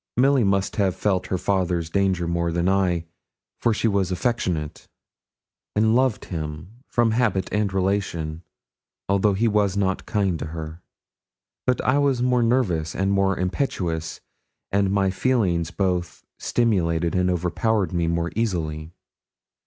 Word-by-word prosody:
Milly 135 0 +4
must 95 -1 0
have 95 -3 +1
felt 95 -1 0
her 95 - -1
father's 90 -3 -1
danger 95 -3 +1
more 85 0 0
than 85 +1 0
I, 90 -3 +1 0.5
for 120 - +2
she 110 +1 +1
was 100 -3 +1
affectionate, 90 - -2 0.9
and 110 +1 +3
loved 130 -3 +1
him 80 +7 -6
from 120 -2 +2
habit 110 -5 +1
and 105 -1 +1
relation, 90 -5 -1 0.7
although 100 +1 +2
he 115 +4 +2
was 100 -3 +1
not 95 -2 -1
kind 95 -5 0
to - - -4
her. 80 +1 -7 0.9
But 125 - +2
I 135 +3 +2
was 140 -3 +2
more 125 -1 +3
nervous 100 -10 +1
and 95 +1 +1
more 95 -1 +2
impetuous, 90 - -2 0.5
and 100 -1 +2
my 95 -1 +2
feelings 95 -8 +1
both 90 -1 -2 0.2
stimulated 85 -8 +1
and 90 0 +2
overpowered 90 +4 0
me 85 -1 0
more 85 0 -1
easily. 80 -7 -2
95 Hz, 140 wpm, -23 LUFS, 85-105 Hz, 0.9 s, Milly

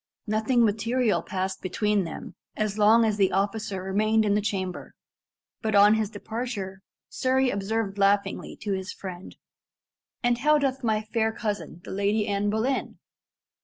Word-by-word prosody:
Nothing 225 +3 +2
material 225 +2 +1
passed 190 0 -3
between 205 +1 0
them 165 - -7 0.2
as 215 -1 -1
long 225 +2 +6
as 215 -2 0
the 195 -2 +3
officer 200 0 -1
remained 215 +3 +2
in 205 - +2
the 210 - +2
chamber, 190 -3 -4 0.7
but 215 -1 0
on 205 +1 +7
his 220 -2 0
departure 205 -3 -5 0.3
Surrey 260 0 +1
observed 200 0 -2
laughingly 200 0 +1
to 205 -1 -1
his 190 +1 -4
friend, 185 -1 -8 0.9
"And 240 0 +2
how 300 +3 +4
doth 270 -2 -1
my 215 -2 +1
fair 220 0 0
cousin, 205 -6 -4
the - - -8
Lady 205 +2 0
Anne 205 0 0
Boleyn?" 225 +6 -1
210 Hz, 150 wpm, -26 LUFS, 200-225 Hz, 0.9 s, on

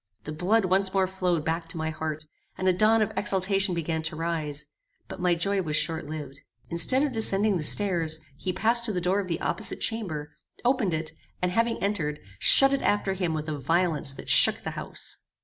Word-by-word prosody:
The 155 - -6
blood 190 +7 +1
once 190 +1 +2
more 190 -1 +3
flowed 180 -4 -2
back 165 +1 -2
to 165 - -5
my 160 0 -3
heart, 155 -1 -5 0.3
and 185 - -2
a 185 - +4
dawn 215 +4 +3
of 210 - -3
exultation 195 -1 +1
began 160 -1 -2
to 160 0 -2
rise: 155 -3 -4 0.4
but - - -9
my 180 -1 +2
joy 195 +3 0
was 155 -4 -3
short 160 +1 -1
lived. 145 -2 -8 0.3
Instead 255 - +4
of 295 - -1
descending 215 -3 +1
the 160 - -4
stairs, 165 -4 +2 0.2
he 185 +6 -4
passed 230 +6 +2
to 220 - +2
the 180 - -1
door 180 +3 0
of 195 - -4
the 170 - -3
opposite 220 - 0
chamber, 160 -10 -2 0.3
opened 240 -9 +1
it, 155 -1 -4 0.3
and 180 0 -1
having 230 +4 0
entered, 165 -8 -2 0.2
shut 270 0 +8
it 275 - 0
after 205 -1 0
him 180 -4 -2
with 155 0 -5
a 150 -2 -4
violence 165 0 0
that - - -11
shook - - +4
the - - -4
house. - - -4
180 Hz, 205 wpm, -26 LUFS, 160-200 Hz, 0.4 s, shut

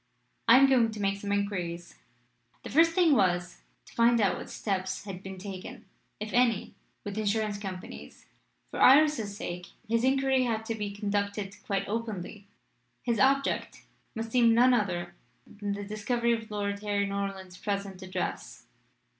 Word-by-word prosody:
I 230 - +9
am 275 - +7
going 250 -4 +4
to 215 - -7
make 200 0 0
some 200 0 -4
inquiries." 180 -4 -2 0.7
The - - -7
first 330 +3 +5
thing 345 -4 +4
was 180 -6 +1 0.2
to - - -17
find 235 0 +4
out 200 -3 +2
what - - -8
steps 190 -2 -3
had 195 -3 -7
been 190 -1 -8
taken, 190 -1 -8 0.3
if 215 +1 -5
any, 235 -4 +2 0.3
with 205 +1 -4
insurance 210 -1 0
companies. 180 - -8 0.5
For - - -4
Iris's 265 -7 +5
sake 180 0 -5 0.2
his 230 +1 +1
inquiry 265 0 +3
had 225 -2 -2
to 225 - -2
be 210 -2 -3
conducted 200 0 -2
quite 195 -1 -1
openly. 210 -2 -5 0.6
His 235 -3 0
object 275 +3 +1 0.3
must 225 0 -4
seem 235 -2 +5
none 250 +2 +6
other 175 -6 -1 0.3
than 205 -1 -5
the 205 0 -5
discovery 235 +3 0
of 225 -1 -4
Lady 200 -1 -3
Harry 200 -1 +1
Norland's 195 -2 -4
present 200 -2 -3
address. 185 -1 -5
205 Hz, 155 wpm, -29 LUFS, 195-230 Hz, 0.7 s, I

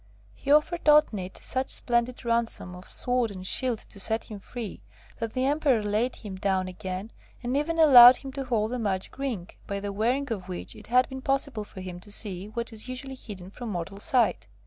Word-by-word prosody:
He 280 - -3
offered 305 +3 +3
Otnit 220 -12 +4
such 260 +1 -1
splendid 240 +1 +1
ransom 230 -6 0
of 180 +1 -11
sword 245 -2 0
and 185 -2 -8
shield 250 +3 +1
to 205 - -11
set 220 +3 0
him 210 - -6
free, 215 - -7 0.4
that 225 -1 -3
the 255 0 0
Emperor 275 -5 +2
laid 215 +5 0
him 200 -4 -8
down 190 -1 0
again, 185 +3 -6 0.3
and 245 +2 -1
even 315 +4 0
allowed 255 -6 +10
him 270 +1 -8
to 275 -1 -4
hold 225 -3 0
the 250 - -2
magic 195 +2 -3
ring, 235 -11 -3 0.2
by 200 0 -2
the 200 0 -4
wearing 245 +6 0
of 185 -3 -8
which 180 - -5
it 210 - -11
had 250 +2 +4
been 265 -1 -6
possible 270 -4 -1
for 195 -2 -10
him 180 -1 -7
to 205 +3 -13
see 200 -2 -1
what 235 +2 -5
is 220 +3 -6
usually 265 +1 -5
hidden 195 -7 -8
from 240 +2 -7
mortal 195 +1 -5
sight. 230 - +1
230 Hz, 205 wpm, -27 LUFS, 195-260 Hz, 0.4 s, allowed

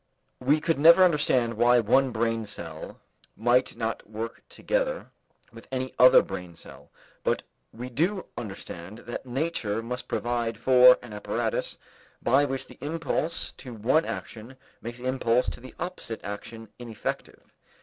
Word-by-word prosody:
We 140 +4 +3
could 165 -2 0
never 170 +5 +8
understand 145 -8 +3
why 120 +2 +4
one 130 +4 +3
brain 115 -1 -1
cell 80 -5 -8 0.4
might 120 +4 +2
not 115 -2 -4
work 110 +1 -6
together - - -2 0.4
with - - -13
any 130 0 -3
other 125 - +8
brain 90 -3 -7
cell, - - -14 0.3
but - - 0 0.3
we 120 +3 -7
do 170 - -1
understand 95 -2 -7
that 120 +2 -6
nature 120 -6 -1
must 125 +2 -5
provide 120 -2 -1
for 125 +1 +7
an 120 -3 -10
apparatus 105 - -2 0.4
by 135 +4 +3
which 135 -1 -3
the - - -16
impulse 165 +2 -2
to 125 -4 -9
one 130 +9 +2
action 115 +4 -7 0.2
makes 120 +1 -7
the 125 - -9
impulse 125 -1 +1
to - - -9
the 130 +1 -12
opposite 175 -10 -5
action 110 +2 -7
ineffective. 115 -3 -6
120 Hz, 145 wpm, -27 LUFS, 115-135 Hz, 0.4 s, never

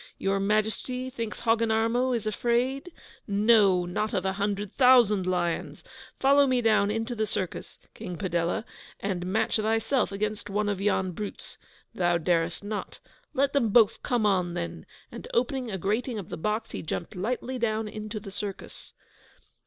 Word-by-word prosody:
Your 195 0 0
Majesty 220 +5 -1
thinks 230 -4 -5
Hogginarmo 230 +2 +2
is 225 - -3
afraid? 245 - 0 0.4
No, 200 -3 +4
not 210 +5 -2
of 185 - -1
a 190 - +1
hundred 200 0 -2
thousand 240 -8 +5
lions! 175 -4 -1 0.4
Follow 280 +1 +5
me 255 -1 +2
down 215 -3 +3
into 225 +3 -2
the 220 -2 -1
circus, 185 -2 -4 0.2
King 180 -2 -7
Padella, 175 +1 -1 0.3
and 185 -3 -3
match 210 +5 +1
thyself 225 +4 +1
against 210 +1 -3
one 205 +1 0
of 200 -2 -2
yon 190 -2 +1
brutes. 205 +4 -7 0.3
Thou 175 -1 +2
darest 170 +1 0
not. 205 0 -5 0.4
Let 275 +1 +2
them 260 -6 +2
both 220 0 +4
come 240 -4 0
on, 180 -4 +1
then!' 170 -1 -5 0.2
And - - -8
opening 270 - 0
a 195 - -3
grating 220 +6 -1
of 195 -5 -6
the - - -4
box, 215 +6 -2
he - - -5
jumped 165 +1 -5
lightly 250 +6 -3
down 220 -1 0
into 215 0 -5
the 200 -1 -9
circus. 200 0 -7
210 Hz, 160 wpm, -27 LUFS, 190-235 Hz, 0.4 s, thousand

